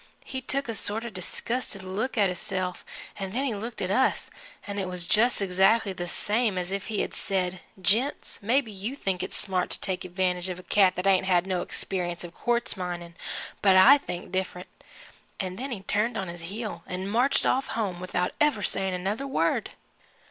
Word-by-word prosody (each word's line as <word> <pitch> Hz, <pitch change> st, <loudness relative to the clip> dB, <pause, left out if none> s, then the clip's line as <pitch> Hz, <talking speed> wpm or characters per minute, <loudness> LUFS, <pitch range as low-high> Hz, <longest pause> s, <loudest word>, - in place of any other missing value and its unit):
He 260 Hz, -, -4 dB
took 275 Hz, +1 st, -1 dB
a 230 Hz, -, -2 dB
sort 220 Hz, +1 st, +1 dB
of 235 Hz, -, -4 dB
a -, -, -18 dB
disgusted 200 Hz, +2 st, -2 dB
look 210 Hz, +8 st, -2 dB
at 205 Hz, -2 st, +5 dB
hisself, 185 Hz, 0 st, -2 dB, 0.4 s
'n' 195 Hz, -1 st, -3 dB
then 265 Hz, +4 st, 0 dB
he 255 Hz, -, 0 dB
looked 220 Hz, +2 st, -4 dB
at 185 Hz, -, -1 dB
us 260 Hz, +5 st, +2 dB, 0.3 s
an' 205 Hz, 0 st, -4 dB
it 190 Hz, -, -1 dB
was 180 Hz, -1 st, -3 dB
just 220 Hz, +2 st, +3 dB
exactly 195 Hz, +3 st, +3 dB
the 175 Hz, -1 st, -4 dB
same 210 Hz, +2 st, 0 dB
as 180 Hz, 0 st, -2 dB
if 195 Hz, -1 st, -3 dB
he 215 Hz, -2 st, 0 dB
had -, -, -3 dB
said 185 Hz, -2 st, -1 dB, 0.2 s
'Gents, 230 Hz, +10 st, +1 dB
maybe 235 Hz, +2 st, +2 dB
you 205 Hz, +6 st, -4 dB
think 195 Hz, -9 st, -1 dB
it's -, -, -3 dB
smart 185 Hz, -3 st, 0 dB
to -, -, -1 dB
take 185 Hz, -1 st, -2 dB
advantage 180 Hz, 0 st, -1 dB
of 180 Hz, -, -3 dB
a 180 Hz, -, -10 dB
cat 190 Hz, -1 st, +4 dB
that 180 Hz, -, -3 dB
ain't 190 Hz, -1 st, +4 dB
had 180 Hz, -1 st, +4 dB
no 185 Hz, -2 st, 0 dB
experience 175 Hz, -2 st, -2 dB
of 175 Hz, -1 st, -8 dB
quartz 240 Hz, +3 st, 0 dB
minin', 175 Hz, -2 st, -5 dB, 0.5 s
but 195 Hz, -2 st, +6 dB
I 255 Hz, +10 st, +9 dB
think 180 Hz, -8 st, -6 dB
different' 185 Hz, -1 st, -3 dB, 0.7 s
an' 185 Hz, -1 st, -3 dB
then 270 Hz, +4 st, -4 dB
he 225 Hz, -7 st, -4 dB
turned 215 Hz, +4 st, 0 dB
on 190 Hz, -2 st, -3 dB
his 175 Hz, 0 st, -7 dB
heel 215 Hz, +2 st, -5 dB
'n' 185 Hz, +1 st, -3 dB
marched 245 Hz, +7 st, +3 dB
off 265 Hz, +1 st, +2 dB
home 195 Hz, -6 st, -1 dB
without 180 Hz, 0 st, -1 dB
ever 295 Hz, -9 st, +3 dB
saying 190 Hz, -1 st, 0 dB
another 205 Hz, +9 st, -2 dB
word. 270 Hz, -, +1 dB
195 Hz, 200 wpm, -27 LUFS, 180-225 Hz, 0.7 s, I